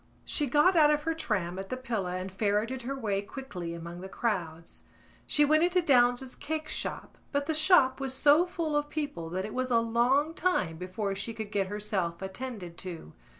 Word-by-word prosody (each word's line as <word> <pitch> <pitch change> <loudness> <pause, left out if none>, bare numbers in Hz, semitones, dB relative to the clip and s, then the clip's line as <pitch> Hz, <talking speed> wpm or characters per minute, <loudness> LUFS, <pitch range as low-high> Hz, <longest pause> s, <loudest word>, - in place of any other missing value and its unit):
She 295 - 0
got 300 +8 +4
out 305 -3 +6
of 300 0 +2
her 325 +1 0
tram 190 - -2
at 195 - -6
the 255 - -3
Pillar 210 -8 -2
and 185 +1 -5
ferreted 215 +6 0
her 270 +3 -4
way 205 -6 -1
quickly 200 -8 -6
among 170 +1 -8
the 190 - -7
crowds. 170 -8 -3 0.4
She 295 - +4
went 310 +2 +4
into 355 +1 +3
Downes's 250 -4 +3
cake 310 +1 -4
shop - - -5
but 285 0 0
the 320 - 0
shop 310 -5 +4
was 270 -1 -2
so 300 +6 +5
full 330 -4 -2
of 295 0 0
people 290 - -4
that 185 +3 -2
it 210 - -6
was 255 0 -1
a 235 - +4
long 245 +7 +2
time 310 - 0
before 195 +3 -3
she 205 +4 -5
could 220 -2 -6
get 200 -2 0
herself 195 -4 -2
attended 190 -4 -6
to. 170 - -8
235 Hz, 195 wpm, -29 LUFS, 190-295 Hz, 0.4 s, out